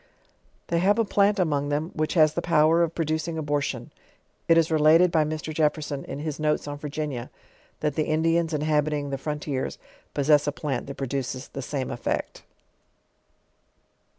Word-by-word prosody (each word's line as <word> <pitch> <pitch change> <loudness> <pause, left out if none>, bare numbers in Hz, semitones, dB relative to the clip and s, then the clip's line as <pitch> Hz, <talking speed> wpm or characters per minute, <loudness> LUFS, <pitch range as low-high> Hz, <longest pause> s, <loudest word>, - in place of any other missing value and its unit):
They 170 - +1
have 200 +5 +3
a 230 - +2
plant 200 0 +3
among 145 -6 0
them, 150 +4 -1
which 155 +2 -1
has 155 -2 +5
the 170 - -1
power 165 0 +4
of 165 -1 0
producing 160 0 -1
abortion. 145 -2 -2 0.6
It 165 - +5
is 165 0 +3
related 160 +3 +5
by 160 -2 +3
Mr. 155 +1 -4
Jefferson 150 -2 0
in - - -6
his 150 0 -4
Notes 150 -1 0
on 145 0 -5
Virginia, 145 -4 -4 0.5
that 150 -2 0
the 155 +1 0
Indians 165 +1 +1
inhabiting 150 -1 0
the 135 - -3
frontiers 150 -2 -3 0.4
possess 145 0 +3
a - - +2
plant 140 -3 -3
that 140 - -7
produces 135 -1 -3
the 135 - -6
fame 135 0 -3
effect. 120 - -3
150 Hz, 160 wpm, -25 LUFS, 145-160 Hz, 0.6 s, has